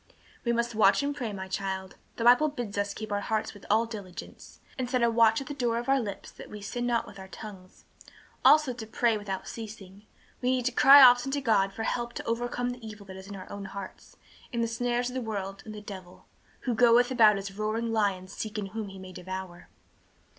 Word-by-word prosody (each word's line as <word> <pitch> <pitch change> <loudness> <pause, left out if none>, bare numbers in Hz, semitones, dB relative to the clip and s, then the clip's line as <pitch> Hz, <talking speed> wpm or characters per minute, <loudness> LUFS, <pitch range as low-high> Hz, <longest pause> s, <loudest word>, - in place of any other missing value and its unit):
"We 235 - +1
must 235 0 0
watch 215 +4 +4
and 285 0 -1
pray, 245 -6 -3
my 190 -1 -6
child. 190 0 -4 0.2
The 230 - -3
Bible 245 +6 +6
bids 240 -8 -5
us 200 0 -1
keep 215 -1 -6
our 205 0 0
hearts 220 +1 -2
with 205 - -14
all 220 +2 +4
diligence, 205 -6 -10 0.2
and 255 -3 -3
set 250 -2 +1
a 235 - +4
watch 225 -1 +4
at - - -6
the 290 - -5
door 240 -4 0
of 240 - -4
our 270 0 +4
lips 205 -5 -6
that - - -12
we 210 - -8
sin 240 +4 -3
not 235 -1 +1
with 195 - -12
our 190 - -9
tongues. 190 -1 -11 0.6
Also 300 -4 +6
to 230 -2 -8
pray 230 +1 +1
without 200 -2 -5
ceasing. 210 -2 -9 0.3
We 250 - +1
need 255 -1 +1
to 255 - +2
cry 275 +3 +9
often 245 +1 +7
to 285 - +1
God 215 -7 +2
for 225 - -5
help 240 +1 -2
to - - -6
overcome 245 +1 -1
the 245 -1 -10
evil 215 -2 -9
that 190 -1 -10
is 190 0 -10
in 200 - -7
our 185 - -9
own 200 -1 -6
hearts, 195 0 -9 0.3
and 235 -1 0
the - - +1
snares 245 +1 -1
of - - -9
the 260 - -2
world 200 -3 -4
and 215 - -7
the 210 - -8
devil, 190 -3 -10 0.4
'who 250 - -1
goeth 240 +2 +5
about 220 -5 +6
as 195 0 -5
a - - -15
roaring 220 +3 -2
lion 200 -4 0
seeking 210 +1 -5
whom 220 0 -5
he 195 - -10
may 185 0 -10
devour.'" 185 -1 -7
220 Hz, 230 wpm, -28 LUFS, 195-240 Hz, 0.6 s, cry